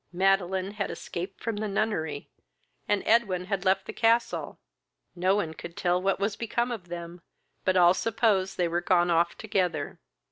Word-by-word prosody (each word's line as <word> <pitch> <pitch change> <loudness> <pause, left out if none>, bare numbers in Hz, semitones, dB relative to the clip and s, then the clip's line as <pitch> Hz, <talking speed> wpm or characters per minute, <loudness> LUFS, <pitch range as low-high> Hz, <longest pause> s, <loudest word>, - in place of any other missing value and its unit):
Madeline 190 +1 +1
had 205 -1 -3
escaped 185 +3 -6
from 230 -2 -2
the 215 +1 -2
nunnery, 195 -8 -2 0.6
and 205 -1 +1
Edwin 200 -6 +2
had 195 -1 -2
left 190 +1 +2
the - - -6
castle. 230 +1 +1 0.6
No 185 +2 +2
one 170 -6 -1
could 170 +1 -10
tell 180 0 +1
what 195 +1 +1
was 200 +1 0
become 235 +2 -1
of 205 -7 -6
them, 170 0 -7 0.4
but 185 0 +3
all 175 0 +7
supposed 210 -3 +1
they 175 - +2
were 170 +1 -1
gone 175 0 +3
off 170 +1 +2
together. 180 -8 -1
190 Hz, 170 wpm, -27 LUFS, 175-205 Hz, 0.6 s, all